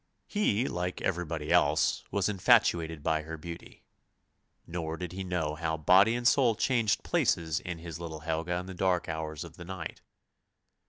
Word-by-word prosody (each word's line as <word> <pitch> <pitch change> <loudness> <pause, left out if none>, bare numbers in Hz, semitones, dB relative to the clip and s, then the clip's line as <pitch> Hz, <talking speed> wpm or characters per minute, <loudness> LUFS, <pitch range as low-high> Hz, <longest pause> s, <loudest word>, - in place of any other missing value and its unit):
He, 130 - +1
like 90 +1 -3
everybody 85 -4 -2
else, - - +3
was 100 - 0
infatuated 85 -5 +3
by 80 -1 +1
her 80 +1 -7
beauty, 85 +2 -10 0.8
nor 80 -1 -4
did 90 -1 -5
he 95 +1 -5
know 85 -5 -1
how 80 0 -2
body 95 +8 +5
and 120 0 +1
soul 120 -3 +4
changed 115 -4 +1
places 80 -3 +1
in 90 -2 -5
his 80 -1 -8
little 80 -2 -6
Helga 80 +2 -2
in 90 +1 -3
the 95 - -7
dark 90 -1 +1
hours 80 -1 -4
of - - -12
the 85 - -9
night. 95 -2 -7
85 Hz, 165 wpm, -30 LUFS, 80-95 Hz, 0.8 s, body